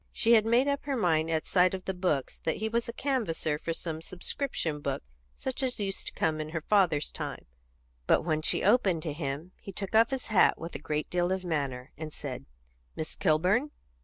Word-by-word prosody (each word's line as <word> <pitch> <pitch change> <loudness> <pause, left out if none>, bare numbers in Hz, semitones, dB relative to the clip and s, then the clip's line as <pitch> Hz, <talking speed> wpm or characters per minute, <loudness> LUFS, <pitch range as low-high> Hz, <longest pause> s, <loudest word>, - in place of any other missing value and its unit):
She 230 - +2
had 220 -1 +5
made 240 +4 +4
up 280 0 0
her 280 -1 -1
mind, 165 -6 +2
at 160 -1 0
sight 180 0 +3
of 185 - -8
the 190 - -1
books, 180 -7 -1
that 160 - -1
he 220 - -2
was 235 +2 -1
a - - -1
canvasser 220 - -1
for 165 - -3
some 165 -1 -4
subscription 175 - -3
book, 140 -2 -3 0.3
such 265 +1 -3
as 255 -3 0
used 195 -2 -3
to - - -4
come 155 -1 0
in 155 - -5
her 165 0 -3
father's 165 -6 +2
time, - - -6 0.6
but - - +4
when 155 -2 0
she - - +3
opened 195 -6 +3
to 155 - -2
him 150 +3 -4
he 195 - -7
took 195 +1 -5
off 225 +1 +6
his 265 -2 -3
hat 190 - +5
with 165 +1 -7
a - - -5
great 150 0 -3
deal 175 0 +1
of 190 0 -1
manner, 140 -6 -2
and 155 -1 -5
said 135 -4 -6 0.5
"Miss 155 - -5
Kilburn?" 185 - +2
175 Hz, 215 wpm, -29 LUFS, 155-220 Hz, 0.6 s, off